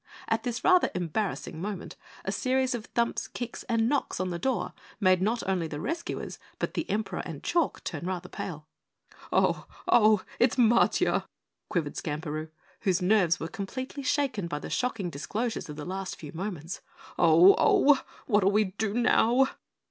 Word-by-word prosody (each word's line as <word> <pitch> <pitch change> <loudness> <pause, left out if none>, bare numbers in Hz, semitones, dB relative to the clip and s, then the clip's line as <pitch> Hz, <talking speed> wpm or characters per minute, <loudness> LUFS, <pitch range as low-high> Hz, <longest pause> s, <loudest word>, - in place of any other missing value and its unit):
At 225 0 +1
this 240 0 -3
rather 370 -1 +5
embarrassing 175 -1 -2
moment 200 -1 -5 0.3
a - - -1
series 260 0 +1
of 230 -3 -5
thumps, 235 0 -1
kicks, 245 -1 -6
and 230 -1 +2
knocks 285 +2 0
on 185 -1 -1
the 170 - -3
door 205 -3 -1 0.3
made 185 -3 +4
not 220 +1 0
only 185 -4 0
the 150 -2 -5
rescuers, 335 - -4 0.2
but - - -2
the 320 - -3
Emperor 215 0 -1
and 160 -4 -7
Chalk 340 -4 0
turn 170 +1 -4
rather 180 -1 -3
pale. 155 -5 -6 0.7
"Oh! - - +2 0.2
Oh! 215 -3 +5 0.2
It's 245 -1 +4
Matiah!" 235 -2 +3 0.4
quavered 160 -6 -2
Skamperoo, 155 +1 -4 0.3
whose 185 -3 +1
nerves 180 -3 +3
were 160 - -3
completely 260 - -5
shaken 260 - 0
by 170 - -3
the - - -7
shocking 230 -8 -1
disclosures 215 +9 -3
of 150 - -6
the 150 0 -6
last 190 +1 -4
few 150 -3 -9
moments. 180 -1 -5 0.4
"Oh! 170 +3 +8
Oh! 290 0 +5 0.2
What'll 205 -4 +3
we 210 +2 +4 0.2
do 220 -1 0
now?" 245 +2 +4
200 Hz, 165 wpm, -28 LUFS, 170-240 Hz, 0.7 s, Oh